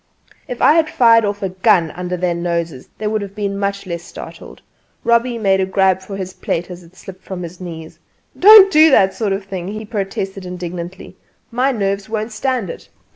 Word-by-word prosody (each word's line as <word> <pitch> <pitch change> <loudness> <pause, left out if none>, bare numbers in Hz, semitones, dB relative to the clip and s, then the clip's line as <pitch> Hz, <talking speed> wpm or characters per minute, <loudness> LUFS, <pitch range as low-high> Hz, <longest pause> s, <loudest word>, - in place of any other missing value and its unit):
'" - - -27
If 250 -3 -5
I - - +7
had 320 -1 +2
fired 230 -2 +4
off 205 0 -3
a 195 - -1
gun 185 -3 +2
under 180 0 -5
their 180 0 0
noses 170 -5 -3
they 215 - -6
would 215 0 -1
have 200 0 -8
been 200 -1 -3
much 200 0 -2
less 170 -2 -5
startled. - - -11 0.4
Robbie 235 +1 +2
made 195 -3 +2
a - - +1
grab 190 -1 +2
for 195 +1 -8
his 185 -1 -6
plate 175 +2 -4
as 180 0 -9
it 170 +1 -19
slipped 190 -1 -12
from 185 -2 -6
his 170 +2 -9
knees. 160 -3 -9 0.4
"Don't 400 0 +8
do 310 -1 +6
that 195 -9 +4
sort 210 0 -2
of 195 +1 -2
thing!" 185 -3 -6
he 215 +2 -6
protested 195 -2 -4
indignantly. 180 0 -7 0.3
"My 255 +4 +1
nerves 200 -3 -2
won't 220 +1 -3
stand 245 -1 -2
it!" - - -12
195 Hz, 205 wpm, -18 LUFS, 180-220 Hz, 0.4 s, Don't